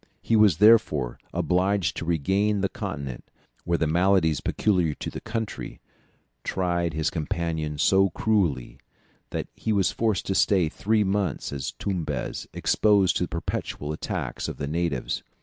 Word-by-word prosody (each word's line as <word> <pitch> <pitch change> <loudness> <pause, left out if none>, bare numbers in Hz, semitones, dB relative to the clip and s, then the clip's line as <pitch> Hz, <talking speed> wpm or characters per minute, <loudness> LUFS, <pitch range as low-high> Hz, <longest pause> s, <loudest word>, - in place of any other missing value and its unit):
He 115 - +2
was, 105 -7 +5
therefore, 100 - +4
obliged 95 +1 +1
to - - -4
regain 95 +6 +1
the 100 - +1
continent, 70 -3 -5 0.4
where 85 0 +1
the 80 - +1
maladies 85 -1 +2
peculiar 90 -8 +1
to - - -5
the - - -7
country 110 -1 -5 0.6
tried 85 -3 -1
his 80 0 0
companions 80 -3 -2
so 95 0 +4
cruelly, 85 - 0 0.5
that - - -4
he 110 - -3
was 100 -3 +2
forced 110 -5 0
to 95 - -1
stay 95 -4 +3
three 105 +5 +1
months 100 -5 -1
at 70 - -3
Tumbez, 80 -9 -3
exposed 100 -3 +3
to 90 - 0
the - - -10
perpetual 80 -2 -4
attacks - - -4
of - - -5
the - - -3
natives. 80 -3 -2
90 Hz, 150 wpm, -25 LUFS, 80-100 Hz, 0.6 s, was